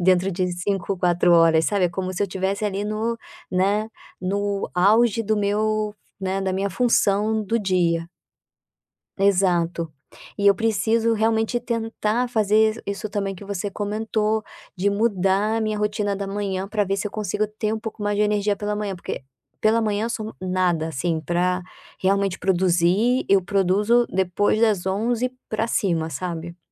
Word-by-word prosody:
dentro 185 +1 +3
de 180 +1 -1
5, 195 +2 -2
4 175 0 +2
horas, 165 -1 +5
sabe, 200 -3 +1
é - - +3
como 185 +1 -3
se 180 - -1
eu - - +1
estivesse 195 +3 -2
ali 200 0 -1
no, 220 +2 -2 0.3
né, 200 +4 +1 0.3
no 200 +1 -2
auge 220 +5 +4
do 215 0 0
meu, 210 +1 0 0.2
né, 190 0 -2
da 190 -1 -1
minha 195 +1 -1
função 215 -1 +2
do 225 +4 0
dia. 175 -4 +1 1.1
Exato. 180 -4 +1 0.5
E 200 - +1
eu 200 - +7
preciso 225 +1 +1
realmente 225 +2 +1
tentar 230 0 -1
fazer 220 0 +2
isso 200 +1 -3
também 195 -1 -2
que 190 - -11
você 200 0 -3
comentou, 215 +1 -1 0.3
de 190 +3 +1
mudar 200 0 +1
a - - -2
minha 215 -1 -1
rotina 210 -1 -1
da 200 0 -4
manhã 195 -1 -3
para 210 0 0
ver 195 0 -1
se 200 - -2
eu - - -5
consigo 210 0 -1
ter 215 0 -3
um - - -3
pouco 220 -1 -6
mais 205 0 0
de 210 - +2
energia 210 -1 +1
pela 210 +1 -2
manhã, 205 -2 -3
porque 175 - -6 0.4
pela 225 +1 +3
manhã 210 0 0
eu - - -4
sou 220 -2 -4
nada, 180 -3 0
assim, 160 +2 -1
para 180 +3 0 0.4
realmente 195 0 +1
produzir, 190 +6 +2
eu 195 -1 +5
produzo 205 +5 +2
depois 190 +3 +1
das 210 -5 +2
11:00 230 +6 0 0.2
para 220 +1 -1
cima, 170 -8 0
sabe. 170 +2 -5
200 Hz, 165 wpm, -23 LUFS, 185-215 Hz, 1.1 s, eu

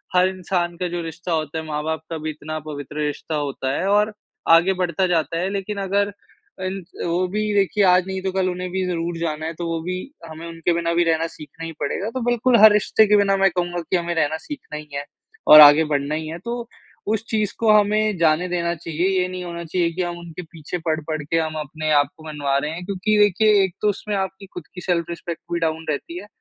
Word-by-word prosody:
हर 180 +1 +5
इंसान 175 -2 -2
का 180 0 -2
जो 175 - -2
रिश्ता 170 +2 -6
होता 155 0 -2
है 160 - -7
माँ-बाप 155 0 -3
का 165 - -3
भी 155 0 -4
इतना 155 +1 -5
पवित्र 150 +1 -4
रिश्ता 150 +2 -4
होता 140 -2 -2
है 190 - -1
और 210 +1 +3 0.4
आगे 185 +3 +2
बढ़ता 180 +2 0
जाता 165 -2 0
है। 185 +2 -1
लेक़िन 200 +1 -4
अगर 200 +1 0 0.5
अन् 190 +1 -3 0.3
वो 175 +2 +1
भी 210 - -1
देखिए 200 +1 +2
आज 180 0 +4
नहीं 190 0 -3
तो 190 0 -2
कल 185 -1 0
उन्हें 180 0 -4
भी 190 +1 -1
ज़रूर 170 -1 -2
जाना 155 -2 -3
है 165 - -3
तो 175 - -4
वो 165 -1 -2
भी 180 +2 -3 0.4
हमें 160 +1 -9
उनके 165 +1 -1
बिना 170 0 0
भी 175 - +3
रहना 165 0 +1
सीखना 160 +1 -10
ही 165 - -5
पड़ेगा, 195 +8 -2
तो 255 +3 -4
बिल्कुल 240 +1 +3
हर 220 - +10
रिश्ते 210 +1 +4
के 210 0 +5
बिना 195 -1 +3
मैं 195 0 +4
कहूँगा 175 0 -2
कि 165 - -2
हमें 170 0 -2
रहना 160 -1 +1
सीखना 285 - -8
ही 150 0 -9
है 140 0 -3 0.4
और 155 0 +11
आगे 145 +2 +9
बढ़ना 145 +1 0
ही 155 0 -4
है, 165 +2 -6
तो 235 +4 -5 0.4
उस 220 +1 0
चीज़ 215 -2 0
को 225 -2 +4
हमें 210 -1 +1
जाने 165 +2 +2
देना 170 -1 0
चाहिए। 165 +2 -2
ये 180 - 0
नहीं 185 0 -6
होना 170 -1 -6
चाहिए 170 +1 0
कि 185 - -2
हम 175 0 -4
उनके 170 0 -8
पीछे 160 +1 -7
पड़-पड़ 155 0 -1
के 165 +3 -1
हम 155 -1 -2
अपने 155 +1 -3
आप - - -2
को 155 - -14
मनवा 145 -2 -1
रहे 150 +2 -2
हैं। 175 +2 -6
क्योंकि 200 +2 0
देखिए 205 0 +4
एक 190 -3 -1
तो 210 - +3
उसमें 205 +1 -3
आपकी 190 0 -3
ख़ुद 180 -3 -10
की 180 - -6
सेल्फ 175 -2 0
रिस्पेक्ट 170 0 -6
भी 170 - 0
डाउन 160 0 -1
रहती 160 +3 -3
है 205 - -11
175 Hz, 235 wpm, -22 LUFS, 160-190 Hz, 0.5 s, और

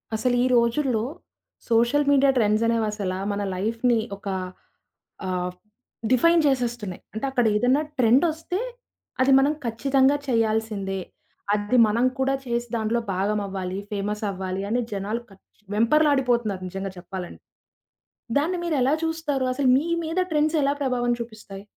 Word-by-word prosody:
అసలు 245 +3 +1
ఈ - - +3
రోజుల్లో 235 0 +2 0.7
సోషల్ 235 +6 +3
మీడియా 275 -1 +5
ట్రెండ్స్ 215 -1 +2
అనేవి 230 -1 +1
అసల 200 -3 -3 0.2
మన 205 - -2
లైఫ్‌ని 230 +5 +1 0.2
ఒక 200 +1 -11 1.0
ఆహ్, 180 -1 -2 0.6
డిఫైన్ 335 +7 +5
చేసేస్తున్నాయి. 240 -8 -1
అంటే 220 +5 -3
అక్కడ 245 -3 +1
ఏదన్న 245 +6 +3 0.2
ట్రెండోస్తే 315 - +2 0.6
అది 265 +1 +4
మనం 280 +3 +3
ఖచ్చితంగా 265 +4 +2
చేయాల్సిందే. 220 -5 0 0.5
అది 210 +4 +1
మనం 230 +4 +1
కూడా 270 +1 +2
చేసి 240 0 -2
దాంట్లో 225 +1 0
భాగమవ్వాలి, 195 -1 -2
ఫేమస్ 210 +1 -3
అవ్వాలి 190 0 -4
అని 240 +3 +1
జనాలు 205 +4 -3
కచ్ 195 +2 -23
వెంపర్లాడిపోతున్నారు 240 -5 +2
నిజంగా 195 +1 -5
చెప్పాలండి. 180 0 -8 1.0
దాన్ని 335 +6 0
మీరు 335 -3 0
ఎలా 265 +3 +3
చూస్తారు? 320 -5 -1
అసలు 265 0 +1
మీ 300 +5 -1 0.2
మీద 325 +3 -2
ట్రెండ్స్ 305 +1 +2
ఎలా 280 - +2
ప్రభావం 245 -2 0
చూపిస్తాయి? 215 -4 -9
235 Hz, 130 wpm, -24 LUFS, 205-270 Hz, 1.0 s, మీడియా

